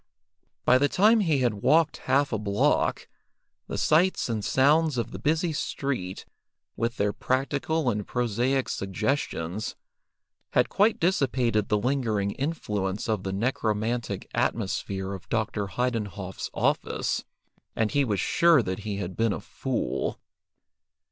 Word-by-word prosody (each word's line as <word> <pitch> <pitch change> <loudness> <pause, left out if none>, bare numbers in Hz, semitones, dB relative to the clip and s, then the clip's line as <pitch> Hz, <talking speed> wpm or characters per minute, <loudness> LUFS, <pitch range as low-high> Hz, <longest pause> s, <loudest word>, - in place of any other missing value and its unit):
By 130 - +6
the 145 +1 +3
time 215 +4 +5
he 160 -9 +2
had 120 -3 +2
walked 160 -1 +3
half 140 0 +3
a 110 - 0
block, 100 -1 +1 0.6
the - - -4
sights 170 -1 +2
and 110 -3 -2
sounds 150 +3 +3
of 120 - -2
the - - -7
busy 160 +2 +1
street, 130 -11 -3 0.5
with 115 +1 -2
their 105 0 +1
practical 140 +3 -1
and 105 -4 0
prosaic 125 +3 0
suggestions, 100 - -2 0.8
had - - +3
quite 215 +3 +3
dissipated 130 - +1
the 105 - +3
lingering 110 -4 0
influence 105 - -2
of 110 -4 0
the 95 - -3
necromantic 110 0 -1
atmosphere 95 -2 -1
of 95 - -9
Dr. 110 -3 -1
Heidenhoff's 105 -5 -3
office, - - 0 0.5
and 110 -1 +1
he 145 - +3
was 105 -7 0
sure 170 -6 +4
that 95 0 -3
he 105 -1 -4
had 90 -2 -4
been 115 -2 +1
a - - -4
fool. - - -3
115 Hz, 135 wpm, -27 LUFS, 105-140 Hz, 0.8 s, By